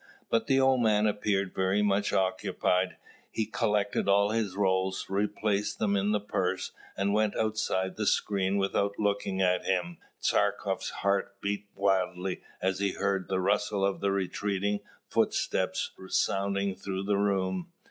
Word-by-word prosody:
But 115 - +2
the 135 -2 +4
old 130 -1 +4
man 105 -2 +3
appeared 100 -2 0
very 95 +2 +1
much 100 0 +1
occupied: 95 -1 0 0.3
he 110 - -1
collected 105 -2 0
all 100 +1 +4
his 110 -4 -1
rolls, 95 -1 +1
replaced 105 +1 0
them 100 -2 +1
in 100 +1 +1
the 105 - +2
purse, 95 -2 -2 0.3
and 100 +1 +1
went 105 -1 +2
outside 105 -4 -1
the 110 -1 -1
screen 100 -1 +1
without 100 +1 0
looking 100 -2 0
at 90 0 +2
him. 90 -2 -1 0.2
Tchartkoff's - - 0
heart 100 0 -1
beat 100 +1 -3
wildly 95 -2 0 0.2
as 95 0 +1
he 100 -1 0
heard 100 -2 -1
the 95 - 0
rustle 100 +1 +1
of 100 -1 0
the 100 - +2
retreating 100 +1 -1 0.3
footsteps - - 0 0.2
sounding 100 +1 +1
through 95 0 -4
the 100 0 +1
room. 95 -3 0
100 Hz, 145 wpm, -29 LUFS, 95-105 Hz, 0.3 s, the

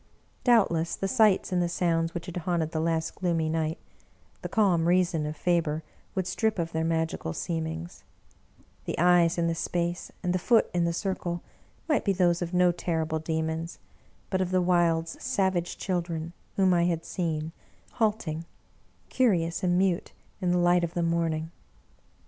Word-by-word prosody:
Doubtless 190 -9 +3
the 195 - -2
sights 210 -1 +3
and 180 -1 +2
the 175 - 0
sounds 165 -1 0
which 170 - -4
had 180 -1 -6
haunted 170 -2 -1
the 160 - -2
last 160 0 0
gloomy 165 -3 0
night, 160 0 -1 0.6
the - - -5
calm 180 -7 +3
reason 175 -3 +2
of 150 0 -5
Faber 160 -2 0 0.3
would 190 -2 0
strip 215 +4 0
of 165 -1 -2
their 160 0 -1
magical 160 - -1
seemings; 165 - -4 0.8
the - - -3
Eyes 175 0 +4
in 170 - +1
the 165 - +1
space 170 +1 -2
and 180 -1 +1
the 185 - +1
Foot 230 +5 +3
in 175 -1 +2
the 170 - +1
circle 175 -1 -3 0.4
might 300 -5 +2
be 200 - +2
those 175 -2 +2
of 175 -1 -3
no 180 -1 +4
terrible 160 -2 -2
Demons, 160 +1 -3 0.5
but 190 -1 +1
of 185 - 0
the 185 0 +2
wild's 170 -2 +1
savage 190 -8 0
children 170 -3 -3 0.2
whom 190 -2 +4
I 170 -1 +3
had 165 -2 -1
seen, 160 -3 -2 0.4
halting, 205 -8 -1 0.7
curi 200 -11 +3
ous 170 - -5
and 180 -1 +2
mute, 185 -2 +1 0.3
in 180 - +1
the 180 - +3
light 175 0 +4
of 170 0 -3
the 175 - +1
morning. 165 -1 0
170 Hz, 170 wpm, -27 LUFS, 165-180 Hz, 0.8 s, Eyes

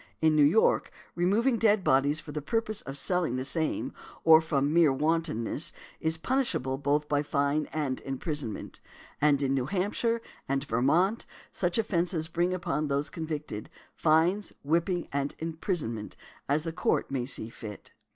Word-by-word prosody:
In 160 -1 +3
New 150 - +6
York, 165 +10 +4 0.2
removing 215 +8 +2
dead 210 -3 +3
bodies 140 +2 +3
"for 150 - -9
the 150 +1 -4
purpose 215 +7 -2
of 135 +1 -7
selling 175 -3 +1
the 130 +1 -2
same," 160 +2 -1 0.3
or 160 0 +8
"from 145 -2 0
mere 165 -4 +5
wantonness," 150 -2 0 0.3
is 160 0 0
punishable 160 - -1
by - - -16 0.4
both 145 - -9
fine 145 +1 +1
and 145 -4 -2
imprisonment. 135 - -4 0.4
And 145 -1 +4
in 135 0 +1
New 130 -2 0
Hampshire 205 +6 0 0.3
and 135 0 0
Vermont 145 - +1 0.2
such 175 +1 0
offences 175 -6 0
bring 175 +2 +1
upon 155 -4 -1
those 140 +1 -1
convicted, 155 -9 -5 0.2
fines, 170 +6 +2
whipping, 170 +4 0
and 140 0 -1
imprisonment, 160 - -3 0.3
as 150 +2 +2
the 165 -1 -4
Court 180 - 0
may 125 -3 -1
see 115 -4 -3
fit. 110 -3 -9
155 Hz, 150 wpm, -29 LUFS, 140-175 Hz, 0.4 s, or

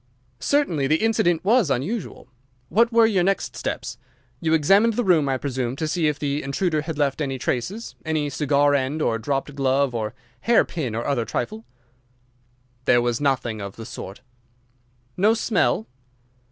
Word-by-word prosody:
"Certainly 175 - +1
the 155 - +3
incident 175 -4 +1
was 220 - +4
unusual. 155 - -3 0.4
What 230 +3 +3
were 230 0 +5
your 200 -5 +2
next 195 +2 0
steps? - - -4 0.4
You 160 -1 +2
examined 200 +9 +4
the 245 - +1
room, 165 -8 +3
I 135 - +1
presume, 130 -2 -3
to 155 +2 -2
see 160 0 +1
if 150 -1 0
the 145 0 -2
intruder 155 +3 -1
had 160 0 -5
left 145 0 0
any 135 -2 -2
traces—any 155 - -3
cigar 145 -1 +2
end 140 +2 0
or 115 0 0
dropped 135 +5 -2
glove 135 -1 +1
or 110 -2 -3 0.2
hairpin 160 - +1
or 115 - -3
other 125 -4 0
trifle?" 115 -1 -4 1.2
"There 120 - +5
was 120 +1 -1
nothing 130 -6 0
of 100 -1 -7
the 115 - -8
sort." 100 -3 -8 1.0
"No 210 +5 +4
smell?" 180 - +1
145 Hz, 155 wpm, -23 LUFS, 130-180 Hz, 1.2 s, were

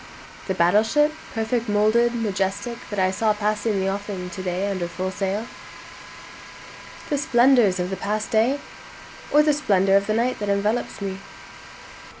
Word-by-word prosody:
The 190 - -1
battle 175 +4 +4
ship, 295 +7 +2 0.2
perfect 225 +1 -1
model'd, 215 +3 +3
majestic, 205 +2 -2
that 205 - -5
I 185 -1 +2
saw 215 +3 +1
pass 210 0 -1
the 200 -4 0
offing 195 -2 -4
to 185 - -6
day 185 +1 -2
under 185 -3 -2
full 185 +2 -4
sail? 195 +3 -2 1.7
The 290 - +1
splendors 240 -8 +4
of 180 +1 -2
the 190 - -3
past 215 +1 -3
day? 235 +6 +2 0.7
Or 300 +1 +5
the 300 0 +3
splendor 195 -9 +2
of 200 0 +2
the 215 - 0
night 240 +3 0
that 205 -1 -3
envelopes 205 +3 -1
me? 195 -1 -4
210 Hz, 155 wpm, -23 LUFS, 190-230 Hz, 1.7 s, Or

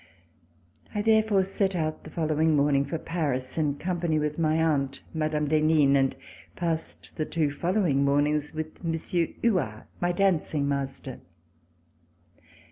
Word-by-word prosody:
I 205 - 0
therefore 220 -3 +4
set 195 0 -1
out 155 -2 -2
the - - -8
following 155 -1 +1
morning 140 -1 +3
for 165 - -3
Paris 140 -7 -2
In 150 -3 0
company 175 -1 -1
w 150 -1 +1
ith 150 - -10
my 155 -1 +2
aunt, 140 -4 0
Mme. 155 -1 0
d'Henin, 155 -2 +4
and 135 -1 +2 0.4
passed 165 -2 -3
the 155 - 0
two 155 -3 0
following 170 -2 +1
mornings 145 +1 +1
with 155 +1 -6
Monsieur 165 +1 0 0.2
Huart, 160 - +1 0.2
my 175 0 +1
dancing 175 -6 +1
master. 135 -2 -3
155 Hz, 135 wpm, -27 LUFS, 145-170 Hz, 0.4 s, therefore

